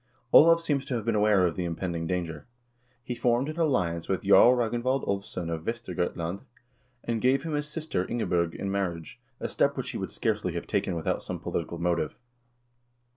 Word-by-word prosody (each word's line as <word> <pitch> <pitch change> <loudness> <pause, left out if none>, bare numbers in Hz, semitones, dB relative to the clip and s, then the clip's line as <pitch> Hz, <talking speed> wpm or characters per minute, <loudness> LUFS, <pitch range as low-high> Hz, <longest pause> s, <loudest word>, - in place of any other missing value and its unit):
Olav 165 +1 +8
seems 145 -5 0
to 135 -3 -2
have 115 -3 -3
been 115 - +1
aware 105 -3 +4
of 85 - 0
the 90 - -2
impending 85 -1 -3
danger. 85 -3 -3 0.6
He 125 - -4
formed 120 +3 +1
an 155 +2 -5
alliance 90 - 0
with 95 - 0
Jarl 110 +5 +7
Ragnvald 120 +2 0
Ulvsson 100 -4 -3
of 80 -1 -3
Vestergotland, 90 -5 -3 0.6
and 115 -2 -2
gave 135 +2 +3
him 160 -2 -4
his 150 0 -1
sister 150 - -3
Ingebj0rg 85 -8 0
in 100 - -3
mar 95 -3 0
riage, 80 -2 -11 0.2
a - - -2
step - - +1
which - - -3
he - - -5
would - - -4
scarcely - - -1
have - - -4
taken 90 - -1
without 80 - -1
some - - -5
polit - - -3
ical 85 - -7
motive. 85 -3 0
100 Hz, 190 wpm, -28 LUFS, 85-125 Hz, 0.6 s, Olav